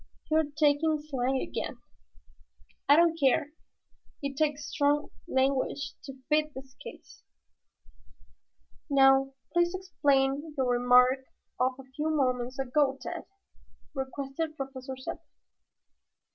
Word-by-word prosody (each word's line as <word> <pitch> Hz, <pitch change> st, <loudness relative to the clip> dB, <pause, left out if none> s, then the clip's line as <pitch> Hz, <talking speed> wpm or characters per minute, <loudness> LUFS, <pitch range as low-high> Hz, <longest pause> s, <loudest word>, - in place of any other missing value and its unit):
"You 310 Hz, -, +4 dB
are 320 Hz, -, +4 dB
talking 300 Hz, +1 st, +2 dB
slang 265 Hz, -3 st, -1 dB
again." -, -, -4 dB, 1.1 s
"I 285 Hz, -, +9 dB
don't 330 Hz, 0 st, +4 dB
care. 275 Hz, +1 st, +2 dB, 0.7 s
It 280 Hz, -1 st, -3 dB
takes 295 Hz, 0 st, 0 dB
strong 290 Hz, 0 st, +1 dB, 0.2 s
language 270 Hz, 0 st, 0 dB
to 270 Hz, -, -8 dB
fit 305 Hz, 0 st, +1 dB
this 265 Hz, 0 st, -10 dB
case." -, -, -12 dB, 1.7 s
"Now 270 Hz, -1 st, +4 dB, 0.2 s
please 345 Hz, +1 st, +2 dB
explain 290 Hz, -5 st, 0 dB
your 255 Hz, -2 st, +1 dB
remark 250 Hz, +2 st, +4 dB, 0.3 s
of 255 Hz, +1 st, +2 dB
a 270 Hz, -, -10 dB
few 280 Hz, +4 st, -4 dB
moments 255 Hz, -4 st, 0 dB
ago, 270 Hz, +1 st, +1 dB
Tad," -, -, -6 dB, 0.7 s
requested 275 Hz, +3 st, -4 dB
Professor 265 Hz, -1 st, -6 dB
Zepplin. 260 Hz, -, -6 dB
275 Hz, 110 wpm, -29 LUFS, 265-300 Hz, 1.7 s, I